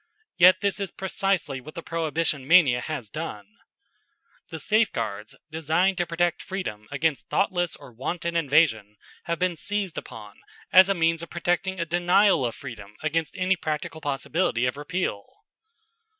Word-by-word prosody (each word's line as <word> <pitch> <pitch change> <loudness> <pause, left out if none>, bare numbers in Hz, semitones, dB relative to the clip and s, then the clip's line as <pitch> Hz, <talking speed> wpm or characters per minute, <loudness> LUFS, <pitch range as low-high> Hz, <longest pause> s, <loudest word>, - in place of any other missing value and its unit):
Yet 185 +1 +6
this 200 0 0
is 200 -2 -3
precisely 190 -8 -1
what 155 +5 -12
the 170 - -6
Prohibition 160 -4 -1
mania 145 -8 +6
has 140 -7 -5
done. 105 -5 -6 1.0
The 160 - -6
safeguards 110 - 0 0.2
designed 165 +4 +1
to 175 - 0
protect 170 0 0
freedom 105 - -5
against 145 -5 -1
thoughtless 175 -4 +1
or 140 -3 -14
wanton 170 +8 -3
invasion 140 -10 +2 0.3
have 170 0 -1
been 180 0 0
seized 200 0 -3
upon 105 -4 -12 0.3
as 185 +1 +8
a 195 - +2
means 165 -1 +1
of 170 - -8
protecting 175 +2 -1
a 170 - 0
denial 175 +1 +3
of 115 - -6
freedom 105 -6 -10
against 155 +1 -1
any 185 +1 +2
practical 155 -1 -4
possibility 145 -2 0
of 125 - -1
repeal. 145 - -3
165 Hz, 150 wpm, -25 LUFS, 135-180 Hz, 1.0 s, as